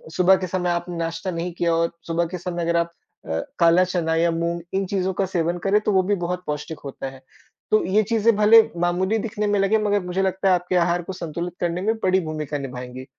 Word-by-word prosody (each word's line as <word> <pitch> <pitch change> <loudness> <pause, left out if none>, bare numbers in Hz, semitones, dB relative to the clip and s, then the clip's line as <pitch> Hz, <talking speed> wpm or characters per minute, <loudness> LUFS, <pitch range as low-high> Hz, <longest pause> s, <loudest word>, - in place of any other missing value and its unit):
सुबह 185 +1 +5
के 185 - -4
समय 180 0 -1
आपने 175 0 -2
नाश्ता 165 +3 -3
नहीं 170 +1 -3
किया 170 0 0
और 165 0 +1 0.2
सुबह 170 +1 0
के - - -2
समय 175 0 -4
अगर 170 0 +1
आप 170 0 0 0.3
अ, 80 0 -2 0.2
काला 170 +1 +5
चना 175 -3 -1
या 170 +1 +2
मूँग 170 +1 -2
इन 195 0 0
चीज़ों 190 0 -1
का 195 +2 0
सेवन 175 -2 -1
करें 200 +2 +4
तो 210 - 0
वो 190 -2 +3
भी 205 +2 +1
बहुत 180 +1 -3
पौष्टिक 150 +1 -4
होता 135 0 -6
है। 135 0 -14 0.5
तो 215 - +4
ये 200 +4 +3
चीजें 225 +1 +2
भले 215 +2 +7 0.2
मामूली 185 +5 +1
दिखने 210 -1 -2
में 205 -1 +1
लगे 195 +3 +3
मगर 205 -1 +1
मुझे 180 +2 -1
लगता 190 0 0
है - - +5
आपके 180 +1 -2
आहार 175 0 +2
को 190 - -6
संतुलित 170 0 -5
करने 175 +1 -1
में 220 +3 +1
बड़ी 185 0 +3
भूमिका 155 -3 -4
निभाएँगी। 130 -1 -7
180 Hz, 230 wpm, -23 LUFS, 165-190 Hz, 0.5 s, भले